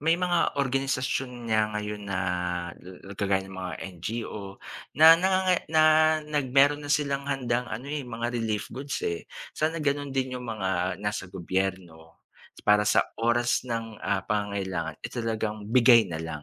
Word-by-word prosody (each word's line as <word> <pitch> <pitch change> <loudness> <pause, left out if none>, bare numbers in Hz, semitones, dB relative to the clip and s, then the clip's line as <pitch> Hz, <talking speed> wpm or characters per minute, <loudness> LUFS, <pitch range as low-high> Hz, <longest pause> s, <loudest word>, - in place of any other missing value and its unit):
...may 165 +3 +3
mga 175 -1 +1
organisasyon 135 -2 -1
niya 110 -2 +2
ngayon 105 -1 -5
na 95 -1 -1 1.0
kagaya 95 -1 +1
ng 95 - -11
mga 95 -2 -5 0.3
NGO 105 -1 -5 0.4
na 160 +2 +10
na 185 - +2
nga 190 0 +3
nga - - +3
na 155 0 +4 0.4
nag 150 -3 -1
meron 145 +2 +5
na 145 - -8
silang 140 -1 0
handang 125 -3 -1
ano, 115 +5 -5
eh, 150 - -2
mga 120 -2 -4
relief 110 -3 -2
goods, 135 +2 -4
eh, 85 -1 -3 0.2
sana 160 +2 -1
gano'n 145 -2 -1
din 130 -1 -2
'yong 125 - -7
mga 100 -4 -2 0.3
nasa 105 -3 -2
gobyerno 90 -3 -4 0.5
para 105 0 +4
sa - - +4 0.2
oras 120 +1 +2
ng, 115 -2 -4
ah, 100 -2 -1
pangangailangan, 95 -6 -2
eh, - - -4
talagang 110 -3 -3
bigay 115 -2 +6
na 85 - -4
lang. 80 -2 -6
115 Hz, 160 wpm, -27 LUFS, 100-135 Hz, 1.0 s, na